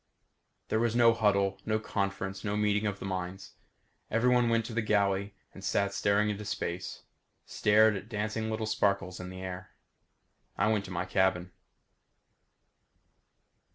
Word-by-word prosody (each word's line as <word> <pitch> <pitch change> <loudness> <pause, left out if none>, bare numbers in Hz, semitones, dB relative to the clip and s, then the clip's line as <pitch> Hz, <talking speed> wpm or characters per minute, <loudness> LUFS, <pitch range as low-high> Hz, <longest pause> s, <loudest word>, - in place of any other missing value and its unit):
There 110 - +1
was 115 0 +1
no 120 -1 +6
huddle, 100 -3 +1
no 110 +1 0
conference, 100 -2 -3
no 105 0 -1
meeting 105 0 +1
of 100 -1 -2
the - - -7
minds. 95 0 -5 0.6
Everyone 125 +2 +3
else - - +1
went 115 -1 +2
to 115 - -6
the 115 - +1
galley 100 -1 +1 0.2
and 95 - -11
sat 100 +1 0
staring 100 +1 +2
into 105 +1 -5
space; 90 -3 -4 0.4
stared 110 +1 +4
at 95 - -5
the - - -21
dancing 110 0 -2
little 110 0 -2
sparkles 100 -3 0
in 90 0 -6
the 95 0 -8
air. 95 0 -7 0.8
I 110 - +2
went 105 -2 0
to 95 - -9
my 90 0 -2
cabin. 95 -1 +1
100 Hz, 155 wpm, -30 LUFS, 95-110 Hz, 0.8 s, no